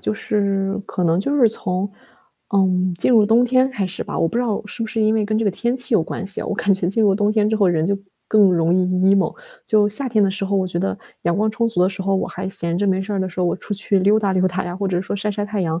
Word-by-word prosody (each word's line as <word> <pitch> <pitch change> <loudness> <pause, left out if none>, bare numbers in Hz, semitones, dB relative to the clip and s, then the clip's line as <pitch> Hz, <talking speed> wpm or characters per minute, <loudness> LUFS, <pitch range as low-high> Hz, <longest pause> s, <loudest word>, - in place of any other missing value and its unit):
就 - - -1
是 200 -2 -1
可 180 - -2
能 170 +2 +2
就 280 +7 -1
是 245 -5 +5
从， 195 -2 -3 0.6
嗯， 185 -2 +2
进 175 - +1
入 220 -3 +6
冬 230 +3 +4
天 255 +2 +2
开 205 -7 -2
始 185 - -5
吧， - - -5
我 - - +2
不 165 - -4
知 245 - +2
道 225 -4 -1
是 230 - -5
不 - - -2
是 220 +1 -3
因 215 0 +3
为 220 -1 +1
跟 215 +1 0
这 225 - 0
个 205 - +2
天 235 +6 -2
气 245 -2 -1
有 195 - +4
关 180 - -5
系 195 - -5
啊， - - -5
我 - - -2
感 200 - +1
觉 190 -2 -1
进 200 +5 0
入 200 -2 +4
冬 205 +1 +1
天 215 -1 +2
之 220 - 0
后 200 -4 +3
人 165 -2 +1
就 200 +1 +1 0.3
更 215 -1 +4
容 170 0 +2
易 185 0 +2 0.3
emo。 195 - +1 0.3
就 210 -2 +3
夏 255 +6 -3
天 215 -4 +3
的 195 - +1
时 195 +1 -3
候， 200 +1 0
我 190 -1 +1
觉 175 -1 -3
得 95 - -2 0.2
阳 170 0 0
光 215 +1 +1
充 230 +1 0
足 215 -6 0
的 185 - +3
时 195 0 -7
候， 195 +1 0
我 - - -1
还 190 +1 -6
闲 170 -3 -3
着 205 - 0
没 190 -1 +1
事 200 +2 -5
儿 195 - -1
的 190 - -1
时 180 - -12
候， 180 - +2
我 - - 0
出 205 - -6
去 200 0 0
溜 200 +3 +3
达 200 -3 0
溜 185 0 +2
达 185 +1 -3
呀， 175 - -5
或 195 +1 -2
者 180 -1 0
说 190 - -4
晒 205 +1 -2
晒 205 0 -3
太 205 0 -3
阳， 165 -2 -1
200 Hz, 345 characters per minute, -20 LUFS, 185-215 Hz, 0.6 s, 入